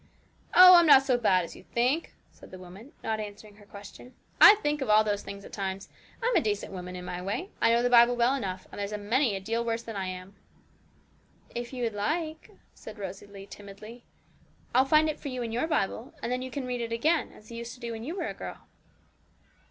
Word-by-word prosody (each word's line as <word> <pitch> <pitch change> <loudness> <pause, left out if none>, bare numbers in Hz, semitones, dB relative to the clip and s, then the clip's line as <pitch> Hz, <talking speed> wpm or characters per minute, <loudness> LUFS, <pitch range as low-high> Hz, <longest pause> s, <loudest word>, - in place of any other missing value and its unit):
'Oh, 365 0 +10
I'm 340 -1 +5
not 270 -2 +8
so 265 -2 +2
bad 195 -7 +2
as - - -11
you - - -13
think,' 250 - -1 0.2
said - - -16
the 185 - -10
woman, 185 +9 -13
not 220 -1 -2
answering 210 0 -9
her 205 -1 -18
question; 205 +5 -13 0.3
'I 425 - +11
think 295 -7 -2
of 265 - -3
all 215 0 +6
those 205 -1 -1
things 200 0 -9
at - - -13
times. 195 -1 -5 0.3
I'm 485 -1 +1
a 345 - +4
decent 205 -4 -3
woman 180 -1 -7
in 180 0 -7
my 180 0 -5
way. 220 - -4
I - - +4
know 235 +1 +3
the 245 - +2
Bible 240 0 +6
well 240 +2 +2
enough, 195 -9 -4
and - - -9
there's 200 0 -3
a 210 - -3
many 225 +2 0
a - - -3
deal 230 +4 -2
worse 230 0 -2
than 225 - -8
I 190 -1 -3
am!' 185 +1 -8 1.2
'If 240 0 -5
you 250 -2 -5
would 230 -2 -1
like,' 310 +9 -3 0.2
said 220 0 -12
Rosalie 200 0 -8
timidly, 205 +4 -12 0.7
'I'll 260 +2 +4
find 305 +3 +4
it 310 0 -3
for - - -7
you 255 -2 -4
in 230 - -5
your 245 +7 -1
Bible, 245 -5 -2
and 235 - -2
then 250 0 -1
you 260 - -6
can 260 +1 -5
read 250 -1 -3
it 230 -1 -4
again, 305 +8 0
as 215 +2 -17
you 230 - -7
used 235 +1 -7
to - - -19
do 235 -1 -5
when 225 0 -6
you 320 +8 -5
were - - -2
a - - -5
girl.' - - -9
230 Hz, 235 wpm, -28 LUFS, 200-260 Hz, 1.2 s, I